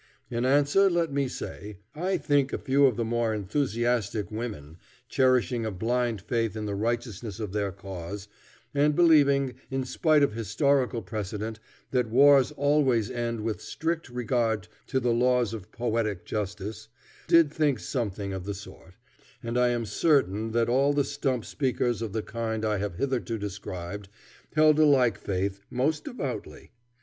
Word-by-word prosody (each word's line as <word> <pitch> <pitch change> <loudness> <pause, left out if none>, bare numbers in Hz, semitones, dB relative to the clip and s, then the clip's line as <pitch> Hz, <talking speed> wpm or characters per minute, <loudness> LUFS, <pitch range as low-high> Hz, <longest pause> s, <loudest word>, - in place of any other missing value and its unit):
In 120 +1 -1
answer 145 +9 +4
let 170 -4 0
me 140 -1 +1
say, 105 -4 -7 0.2
I 180 +4 -1
think 145 -2 +1
a - - -1
few 140 +1 +3
of 125 - 0
the 115 - -1
more 115 -1 0
enthusiastic 110 -2 -1
women, 105 -9 -6 0.3
cherishing 130 -2 +2
a 110 - -1
blind 115 +2 -1
faith 115 +2 -1
in 110 -1 -4
the 100 - -3
righteousness 115 -1 -3
of 105 -4 -4
their 100 -2 -1
cause, 95 +1 -7 0.5
and 145 +1 +3
believing, 140 -6 +4 0.2
in 135 0 -1
spite 155 +2 +3
of 140 - +2
historical 125 +1 +1
precedent, 105 +3 -4 0.3
that 125 -3 +1
wars 135 +3 +6
always 140 -7 +2
end 115 -2 -2
with 110 0 -3
strict 165 -2 -3
regard 120 -4 -1 0.2
to 130 - 0
the 120 -2 +1
laws 125 -2 +2
of 105 -5 -8
poetic 115 -5 -2
justice, 105 +1 -4 0.4
did 165 -3 +5
think 150 -5 +2
something 105 -5 -3
of 95 -1 -5
the 100 0 -3
sort; 95 - -12 0.5
and 115 +1 -3
I 125 0 +4
am 120 -1 0
certain 110 - +1
that 115 -1 +2
all 135 +4 +3
the 145 0 +2
stump 130 -3 -2
speakers 125 -5 -1
of 115 -3 -3
the 110 +1 -2
kind 110 -1 -3
I 105 -1 +1
have 100 -3 -3
hitherto 125 0 -1
described 100 -1 -6 0.5
held 155 0 +5
a 155 - +7
like 130 -5 +4
faith 95 +1 -2
most 145 +5 0
devoutly. 140 - -6
120 Hz, 160 wpm, -27 LUFS, 105-140 Hz, 0.5 s, a